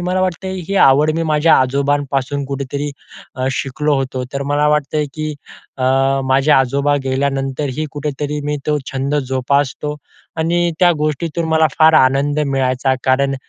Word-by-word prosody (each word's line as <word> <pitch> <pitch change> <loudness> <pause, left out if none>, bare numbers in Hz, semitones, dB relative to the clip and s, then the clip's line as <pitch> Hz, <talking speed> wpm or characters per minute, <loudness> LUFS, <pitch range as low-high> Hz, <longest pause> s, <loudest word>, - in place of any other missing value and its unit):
मला 180 +1 -1
वाटतं 185 0 -2 0.2
ही 200 - -2
आवड 145 +3 +4
मी 165 - 0
माझ्या 150 +2 +4
आजोबांपासून 140 +1 0
कुठेतरी 140 +1 -4 0.4
अ, 130 0 -2
शिकलो 140 +3 -1
होतो, 130 -1 -3
तर 140 0 -3
मला 150 +1 +2
वाटतंय 150 0 0
की 155 -1 -4 0.4
अ, - - -3 0.4
माझे 135 +3 +2
आजोबा 140 +2 +2
गेल्यानंतरही 135 +1 -2
कुठेतरी 150 0 -4
मी 150 0 -1
तो 150 - +1 0.2
छंद 135 +2 -2
जोपासतो 140 +2 -1 0.4
आणि 170 +2 +1
त्या 180 - +6
गोष्टीतून 155 +2 -2
मला 160 0 +4
फार 160 0 +6
आनंद 140 +1 +3
मिळायचा, 130 -1 0
कारण 135 +1 +2
145 Hz, 140 wpm, -17 LUFS, 135-150 Hz, 0.4 s, त्या